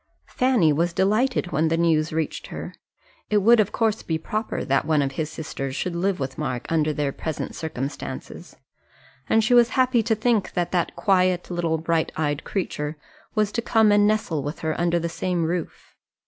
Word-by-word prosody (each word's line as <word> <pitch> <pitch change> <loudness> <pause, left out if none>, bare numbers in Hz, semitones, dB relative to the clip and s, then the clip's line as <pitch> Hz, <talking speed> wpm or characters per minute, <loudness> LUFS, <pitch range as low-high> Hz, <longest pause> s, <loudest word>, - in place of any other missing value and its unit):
Fanny 245 - +3
was 170 +3 0
delighted 210 +2 +1
when 160 +3 +2
the 165 +1 +1
news 160 -2 +2
reached 160 0 -3
her. - - -7 0.6
It 210 - +3
would 225 +3 +5
of 210 -1 +2
course 225 -2 0
be 160 - -2
proper 215 +7 -3
that 135 0 +2
one 155 -2 +2
of 135 - -2
his 155 +2 -3
sisters 135 -4 -5
should 175 +4 -2
live 185 +1 0
with 130 -1 -4
Mark 125 -1 -3
under 155 -2 +2
their 145 -2 -1
present 160 +2 -5
circumstances, 140 -4 -6 0.7
and 225 - +4
she 240 +3 +2
was 240 -1 +6
happy 255 -2 +4
to 220 0 +1
think 225 -1 0
that 175 -1 -1
that 175 -2 0
quiet 185 -3 +1
little 170 -2 0
bright 165 0 0
eyed 150 -1 -1
creature 150 -5 -3 0.4
was 210 -1 +1
to 235 - -1
come 220 -2 +3
and 205 0 +5
nestle 210 -8 0
with 145 +3 -5
her 160 -1 -1
under 175 0 +2
the 170 0 -1
same 175 0 -1
roof. 170 0 -4
170 Hz, 190 wpm, -24 LUFS, 155-210 Hz, 0.7 s, was